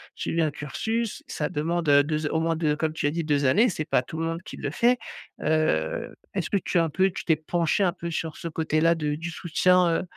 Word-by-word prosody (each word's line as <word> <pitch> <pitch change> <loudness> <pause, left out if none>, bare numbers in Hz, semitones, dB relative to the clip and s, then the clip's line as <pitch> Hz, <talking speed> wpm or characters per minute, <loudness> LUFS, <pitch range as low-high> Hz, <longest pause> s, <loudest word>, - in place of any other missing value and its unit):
suivi 165 - -1
un 155 - +2
cursus, 220 +11 -3
ça 150 - -2
demande, 165 +2 -1
heu, 145 0 +6
2 155 +1 -1
au 160 - 0
moins 165 0 +1
2 155 -2 0
comme 155 0 -1
tu 160 - -3
as 145 - +1
dit 165 0 -2
2 145 -2 +1
années, 205 - +5
c'est 170 -8 -2
pas - - +2
tout 155 - -8
le 165 - -1
monde 165 +1 -3
qui - - -9
le 145 - -4
fait, 240 +9 +3 0.4
heu 155 - 0 0.2
est-ce - - -1
que 200 - +2
tu 180 - -1
as 165 - +4
un - - -3
peu 190 +5 +2
tu - - -7
t'es 160 - +4
penchée 165 +4 0
un 180 - +3
peu 170 -1 -6
sur 160 -1 -3
ce - - -5
côté 160 -1 -1
là 165 +1 +4
de 150 -2 -1
du 165 +3 -5
soutien 180 +2 +3
heu 165 - +1
160 Hz, 260 wpm, -26 LUFS, 150-170 Hz, 0.4 s, heu